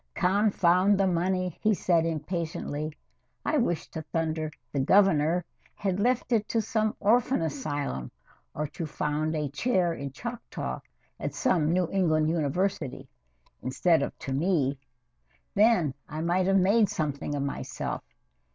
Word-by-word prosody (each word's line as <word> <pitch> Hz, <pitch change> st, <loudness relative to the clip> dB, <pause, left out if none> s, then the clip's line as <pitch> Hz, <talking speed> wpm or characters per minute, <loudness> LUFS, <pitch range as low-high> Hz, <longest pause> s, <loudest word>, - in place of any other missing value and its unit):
"Confound 195 Hz, 0 st, +3 dB
the 195 Hz, -, +4 dB
money!" 185 Hz, 0 st, 0 dB
he 215 Hz, -1 st, +3 dB
said 170 Hz, -3 st, +2 dB
impatiently. 155 Hz, -2 st, -3 dB, 0.5 s
"I 310 Hz, -, +2 dB
wish 175 Hz, -, 0 dB
to 160 Hz, -, -4 dB
thunder 160 Hz, 0 st, -2 dB, 0.2 s
the 140 Hz, -, -1 dB
Governor 175 Hz, +1 st, +4 dB, 0.3 s
had 195 Hz, -1 st, -1 dB
left 245 Hz, +3 st, +1 dB
it 215 Hz, -3 st, +2 dB
to 230 Hz, -, +1 dB
some 215 Hz, 0 st, 0 dB
orphan 235 Hz, -1 st, +3 dB
asylum 145 Hz, -, -3 dB, 0.5 s
or 150 Hz, -, -1 dB
to 165 Hz, -, -5 dB
found 150 Hz, +1 st, -1 dB
a 150 Hz, -1 st, -1 dB
Chair 175 Hz, -, +1 dB
in 140 Hz, -3 st, -5 dB
Choctaw 235 Hz, -, -5 dB, 0.4 s
at -, -, -4 dB
some 170 Hz, -, +2 dB
New 180 Hz, 0 st, +2 dB
England 155 Hz, -5 st, +2 dB
university, 155 Hz, -3 st, -1 dB, 0.5 s
instead 160 Hz, +5 st, +2 dB
of -, -, -3 dB
to 135 Hz, -, -5 dB
me 140 Hz, -3 st, +1 dB, 0.7 s
then 200 Hz, -, +4 dB, 0.2 s
I 155 Hz, +1 st, -4 dB
might 180 Hz, +3 st, +1 dB
have 195 Hz, 0 st, +4 dB
made 200 Hz, +2 st, +4 dB
something 145 Hz, -2 st, -2 dB
of 140 Hz, -, -1 dB
myself. 140 Hz, -, -4 dB
170 Hz, 140 wpm, -28 LUFS, 150-195 Hz, 0.7 s, the